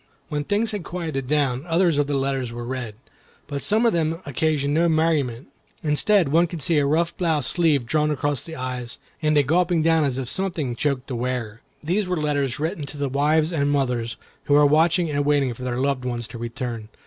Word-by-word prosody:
When 150 -2 -2
things 210 +7 0
had 205 -4 -4
quieted 160 -8 -4
down, 140 -3 +1
others 165 -2 +2
of 145 - +1
the 145 - -1
letters 135 -3 -1
were 120 0 -6
read; 120 -4 -5 0.5
but 140 -1 -5
some 220 +3 +2
of 230 - +4
them 165 -1 0
occasioned 145 0 0
no 170 +2 +3
merriment. 155 -6 0 0.3
Instead, 165 +3 +3
one 170 +4 +4
could 165 -3 -5
see 160 +1 +3
a 140 - +2
rough 170 +3 +1
blouse 160 -6 +1
sleeve 155 -7 +2
drawn 150 +4 +1
across 145 -2 -1
the 160 - -8
eyes, 125 -3 -4 0.2
and 155 -1 +2
a 145 - +5
gulping 170 +3 +2
down 165 -1 +3
as 135 -3 -1
if 130 -2 -3
something 160 -6 -2
choked 140 -2 -1
the 130 - -5
wearer. 120 -2 -3 0.2
These 185 +6 0
were 180 -1 -1
letters 145 -3 -1
written 155 -1 -3
to 145 - -8
the 140 -1 -1
wives 150 +4 +2
and 145 -3 +1
mothers 125 -5 -1 0.3
who 145 - +3
were 145 0 +6
watching 160 +3 +3
and 145 0 0
waiting 140 -3 +2
for 115 - -13
their 125 -1 -2
loved 135 -1 0
ones 120 -2 -3
to 120 - -8
return. 115 -1 -5
145 Hz, 210 wpm, -23 LUFS, 130-160 Hz, 0.5 s, were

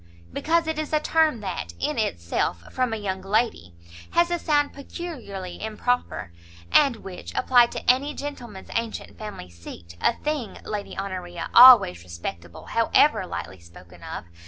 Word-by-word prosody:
"Because 330 +1 +1
it 320 -1 -2
is 310 0 -4
a 305 - +4
term 310 -6 +2
that, 190 -4 -5
in 295 -3 -1
itself, 85 - -2
from 255 -2 0
a 225 - -2
young 190 -2 -3
lady, 195 - -1 0.4
has 340 0 +3
a 345 - 0
sound 290 -3 +1
peculiarly 255 - -7
improper; 220 - -2 0.4
and 275 -5 +5
which, 180 - -9
applied 245 -2 +4
to - - -7
any 270 +4 +3
gentleman's 245 -9 -8
antient 230 -1 -4
family 210 - -8
seat, 85 0 -12
a - - +3
thing, 295 -4 -4
Lady 210 -1 -5
Honoria, 180 -3 -5
always 235 - +8
respectable, 85 0 -8
however - - +3
lightly 95 - -6
spoken 85 +1 -16
of! - - -7
220 Hz, 150 wpm, -24 LUFS, 170-280 Hz, 0.4 s, always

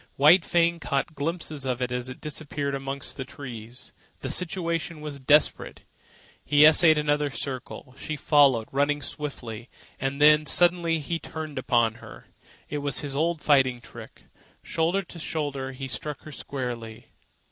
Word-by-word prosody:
White 160 +6 +6
Fang 170 0 +2
caught 140 +1 -2
glimpses 155 -1 -4
of 130 -2 -2
it 125 0 -3
disappearing 145 -2 -3
amongst 135 0 -4
the 135 - -3
trees. 125 -3 -9 0.3
The - - -2
situation 170 -2 -1
was 150 -2 -6
desperate. 145 +3 +2 0.6
He 145 +1 +5
essayed 155 0 +7
another 150 -1 +1
circle. 130 -1 -6
She 155 - -4
followed, 140 -7 +4
running 145 +1 +1
swiftly. 130 -7 -6 0.3
And 135 +1 -2
then, 150 0 +6
suddenly, 175 -2 +3
he 165 +2 -3
turned 155 -4 -6
upon 115 -3 +1
her. - - -12 0.4
It 150 - -3
was 140 -2 +1
his 140 -2 -5
old 165 +1 0
fighting 130 -4 +3
trick. - - -13 0.4
Shoulder 170 +5 0
to 175 -1 -11
shoulder, 145 -4 -3
he 135 +1 -6
struck 150 +3 -4
her 155 - -10
squarely. 120 -6 -6
145 Hz, 145 wpm, -26 LUFS, 130-155 Hz, 0.6 s, essayed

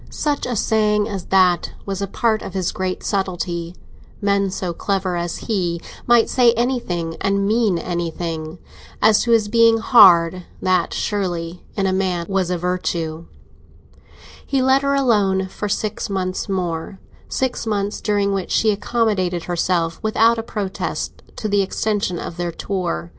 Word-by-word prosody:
Such 295 -2 -2
a 245 - -2
saying 210 -1 +2
as 195 -5 -5
that 185 -2 +3
was 195 -1 -4
a 200 - -1
part 220 +2 0
of 190 - -8
his 185 -2 0
great 185 -1 -3
subtlety—men 190 +1 -2
so 185 -2 -3
clever 190 0 -1
as 170 0 -3
he 175 -6 -1 0.3
might 240 -1 +5
say 245 -2 +4
anything 225 -10 -2
and 200 0 +1
mean 215 -4 +2
anything. 170 -1 -3
And 160 - -10 0.5
as 215 - +3
to 235 - 0
his 225 -2 +4
being 230 +1 +5
hard, 185 -6 +6 0.2
that 185 -2 +1
surely, 175 -4 -3
in 195 - 0
a 190 - +1
man, 185 -3 0
was 190 -2 0
a 180 - 0
virtue. 170 -2 -2 1.2
He 275 - 0
let 265 +1 +4
her 280 0 +1
alone 205 -8 +2
for 210 +2 -4
six 210 +1 -2
months 185 0 -2
more—six 190 +7 -4
months 205 -1 -1
during 205 -1 +1
which 195 -2 -3
she 220 - +3
accommodated 200 -5 0
herself 170 -1 -1
without 225 +1 +3
a - - 0
protest 205 -4 -4
to 215 - -3
the 205 -1 +2
extension 195 -2 -1
of 165 - -6
their 175 -1 -2
tour. 170 - -3
195 Hz, 155 wpm, -20 LUFS, 175-215 Hz, 1.2 s, hard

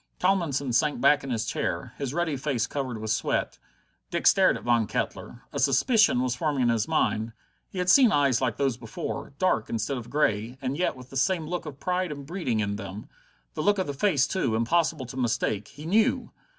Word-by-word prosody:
Tomlinson 160 -9 0
sank 145 +2 +2
back 140 +3 +4
in 135 - -6
his 115 -3 -1
chair, - - -3
his 140 -3 -2
ruddy 160 -1 -1
face 135 -4 -1
covered 130 -5 -4
with 110 0 -3
sweat. 110 - -1 0.5
Dick - - -3
stared - - +5
at - - -12
Von 120 -3 +2
Kettler. - - -4
A - - -2
suspicion 140 - +4
was 125 -1 0
forming 140 0 0
in 120 - +3
his 115 -2 +1
mind. 110 +1 0 0.4
He - - -10
had 180 0 -1
seen 245 +4 +7
eyes 140 -4 +2
like 125 -4 0
those 135 -4 0
before, 115 +3 -6
dark 165 -12 +1
instead 115 +4 -2
of 120 - -10
grey, 115 -4 0
and 135 0 -3
yet 180 -1 0
with 125 -1 -13
the 135 - -4
same 165 +4 +1
look 175 +1 -4
of 140 -2 -8
pride 180 -2 -1
and 140 -2 -7
breeding 140 - -2
in 100 -1 -2
them; 100 0 -8 0.4
the - - -3
look 205 0 +3
of 190 - 0
the 145 - -4
face, 145 -2 +2
too, 135 - -1
impossible 155 +4 +1
to 125 - -9
mistake 110 -4 -1
he 150 - -11
knew! 225 +8 +2
135 Hz, 210 wpm, -26 LUFS, 115-165 Hz, 0.5 s, seen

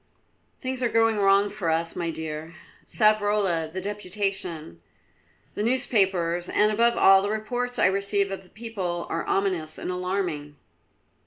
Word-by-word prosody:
"Things 260 -1 -4
are 245 - +1
going 225 -2 +2
wrong 195 0 +5
with 205 +1 -7
us, 165 -1 0
my 170 - -2
dear. 160 0 -6 0.3
Savrola, 205 -7 +2
the 185 - -4
deputation, 190 - -4 0.7
the - - -4
newspapers, 195 -8 +1
and, 210 +1 +3
above 235 +2 +2
all, 195 0 +7
the 200 - -2
reports 245 +4 -3
I - - +3
receive 200 +1 +2
of 195 - -5
the 180 - -20
people, 195 -7 -4
are 165 - -2
ominous 180 -6 -1
and - - -4
alarming." 180 -5 -3
195 Hz, 145 wpm, -25 LUFS, 170-215 Hz, 0.7 s, all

